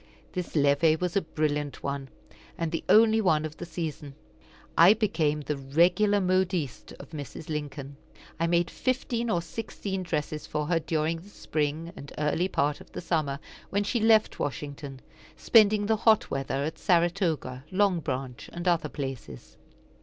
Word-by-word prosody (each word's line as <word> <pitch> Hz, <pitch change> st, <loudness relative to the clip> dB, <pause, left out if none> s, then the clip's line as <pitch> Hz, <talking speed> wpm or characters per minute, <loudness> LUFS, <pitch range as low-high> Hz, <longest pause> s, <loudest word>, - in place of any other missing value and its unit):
This 180 Hz, -3 st, -4 dB
levee 145 Hz, +2 st, +4 dB
was 180 Hz, +1 st, -3 dB
a 200 Hz, -, +3 dB
brilliant 150 Hz, -3 st, -2 dB
one, 140 Hz, -1 st, -3 dB, 0.5 s
and 165 Hz, -2 st, -2 dB
the 165 Hz, -, -2 dB
only 220 Hz, 0 st, +6 dB
one 160 Hz, -6 st, +2 dB
of 155 Hz, 0 st, -7 dB
the 175 Hz, -, -7 dB
season. 155 Hz, -4 st, -5 dB, 0.6 s
I 180 Hz, +6 st, +8 dB
became 160 Hz, -9 st, 0 dB
the 150 Hz, +1 st, -2 dB
regular 175 Hz, +9 st, +3 dB
modiste 185 Hz, -, 0 dB
of -, -, -12 dB
Mrs. 150 Hz, +1 st, -8 dB
Lincoln. 145 Hz, -2 st, -5 dB, 0.4 s
I 165 Hz, -, +2 dB
made 170 Hz, 0 st, +2 dB
fifteen 245 Hz, -2 st, -1 dB
or 175 Hz, -5 st, +1 dB
sixteen 195 Hz, 0 st, -5 dB
dresses 155 Hz, -3 st, -3 dB
for 150 Hz, 0 st, -2 dB
her 165 Hz, +2 st, +1 dB
during 160 Hz, +1 st, -1 dB
the 190 Hz, +5 st, -15 dB
spring 155 Hz, -2 st, -3 dB
and 140 Hz, -, -10 dB
early 150 Hz, +4 st, +1 dB
part 145 Hz, -4 st, 0 dB
of -, -, -16 dB
the -, -, -4 dB
summer, 155 Hz, -5 st, -1 dB, 0.3 s
when 200 Hz, +1 st, +1 dB
she 235 Hz, +4 st, 0 dB
left 220 Hz, 0 st, +4 dB
Washington; 140 Hz, -1 st, -5 dB, 0.4 s
spending 210 Hz, -2 st, +5 dB
the 220 Hz, +1 st, +2 dB
hot 220 Hz, 0 st, +3 dB
weather 135 Hz, 0 st, -1 dB
at 155 Hz, +2 st, -4 dB
Saratoga, 170 Hz, -7 st, +1 dB
Long 190 Hz, -2 st, +2 dB
Branch, 130 Hz, -4 st, -5 dB
and 175 Hz, +1 st, -5 dB
other 165 Hz, -3 st, +2 dB
places. 135 Hz, -, -7 dB
165 Hz, 160 wpm, -28 LUFS, 145-185 Hz, 0.6 s, I